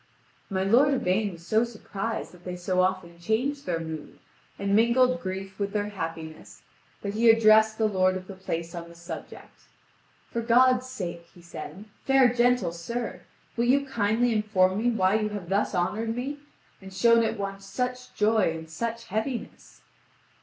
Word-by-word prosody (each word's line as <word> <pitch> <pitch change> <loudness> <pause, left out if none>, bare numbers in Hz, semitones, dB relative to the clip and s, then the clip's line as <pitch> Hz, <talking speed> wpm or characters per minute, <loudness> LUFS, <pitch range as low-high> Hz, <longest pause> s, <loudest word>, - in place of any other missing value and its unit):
My 190 -2 -1
lord 260 +8 +4
Yvain 200 -2 0
was 170 0 -13
so 220 +4 +3
surprised 225 -2 -5
that 180 -1 -17
they 180 0 -5
so 180 +1 0
often 185 -2 -1
changed 255 +10 -1
their 170 -2 0
mood, 160 -2 -7 0.4
and 200 0 0
mingled 250 +3 +4
grief 190 0 -6
with 200 0 -2
their 210 -1 -1
happiness, 165 -5 -7 0.4
that 200 0 -3
he 230 +2 +4
addressed 220 -1 +6
the 220 - +2
lord 185 -2 +2
of 185 - -9
the 195 - -9
place 170 -3 -5
on 170 -1 -7
the 170 - -14
subject. 170 -1 -10 0.7
"For 235 - -2
God's 255 +2 +4
sake," 175 -8 -6
he 175 - -16
said, 185 +4 -9 0.2
"fair 265 -2 +4
gentle 245 -6 +2
sir, 230 +8 -5 0.3
will 235 - +1
you 280 +3 +3
kindly 230 -1 +1
inform 205 -3 +2
me 240 +2 +2
why 205 -2 +2
you 215 -1 -1
have 205 -5 -6
thus 200 0 0
honoured 220 +6 -1
me, 275 +4 -4 0.4
and 190 0 -10
shown 230 +4 +4
at 225 - -1
once 195 0 -5
such 250 +4 -3
joy 215 -3 +3
and 160 0 -10
such 230 +6 -3
heaviness?" 225 +4 -5
210 Hz, 170 wpm, -27 LUFS, 185-235 Hz, 0.7 s, addressed